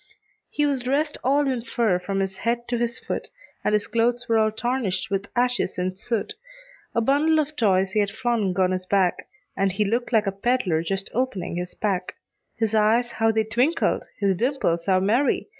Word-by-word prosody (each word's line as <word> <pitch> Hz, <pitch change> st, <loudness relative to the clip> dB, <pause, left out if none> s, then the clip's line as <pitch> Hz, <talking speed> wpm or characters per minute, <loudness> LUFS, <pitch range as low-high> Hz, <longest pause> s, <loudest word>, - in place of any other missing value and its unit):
He 295 Hz, -, 0 dB
was 280 Hz, -3 st, 0 dB
dressed 285 Hz, +4 st, -1 dB
all 280 Hz, +2 st, +2 dB
in 255 Hz, -3 st, -1 dB
fur 225 Hz, -5 st, 0 dB
from 195 Hz, +2 st, -2 dB
his 195 Hz, 0 st, -3 dB
head 235 Hz, +1 st, -1 dB
to 240 Hz, -, 0 dB
his 235 Hz, 0 st, -1 dB
foot, -, -, -4 dB, 0.4 s
And -, -, +1 dB
his 210 Hz, -1 st, +2 dB
clothes 240 Hz, +1 st, 0 dB
were 225 Hz, -1 st, +3 dB
all 215 Hz, 0 st, +3 dB
tarnished 220 Hz, -5 st, -1 dB
with 195 Hz, 0 st, -1 dB
ashes 245 Hz, -4 st, +1 dB
and 185 Hz, +1 st, -2 dB
soot; 230 Hz, -, -3 dB, 0.6 s
A 230 Hz, -, +3 dB
bundle 290 Hz, +6 st, +3 dB
of 305 Hz, 0 st, -1 dB
toys 195 Hz, -6 st, +2 dB
he 215 Hz, -, +1 dB
had 205 Hz, -1 st, +2 dB
flung 215 Hz, -4 st, -1 dB
on 185 Hz, -1 st, +3 dB
his 185 Hz, 0 st, -3 dB
back, 190 Hz, -3 st, +1 dB, 0.3 s
And 195 Hz, 0 st, +1 dB
he 205 Hz, +3 st, 0 dB
looked 235 Hz, +5 st, -1 dB
like 220 Hz, -3 st, +3 dB
a 195 Hz, -, 0 dB
peddler 195 Hz, -5 st, 0 dB
just 195 Hz, +3 st, -3 dB
opening 225 Hz, -8 st, -2 dB
his 180 Hz, 0 st, -5 dB
pack; 190 Hz, -4 st, -2 dB, 0.4 s
His 225 Hz, -1 st, 0 dB
eyes 225 Hz, +3 st, +3 dB
how 225 Hz, -1 st, +1 dB
they 220 Hz, 0 st, +1 dB
twinkled! 245 Hz, +9 st, +1 dB
his 195 Hz, -2 st, +1 dB
dimples 185 Hz, -7 st, 0 dB
how 185 Hz, -1 st, +4 dB
merry! 240 Hz, -, +1 dB
220 Hz, 195 wpm, -24 LUFS, 195-245 Hz, 0.6 s, how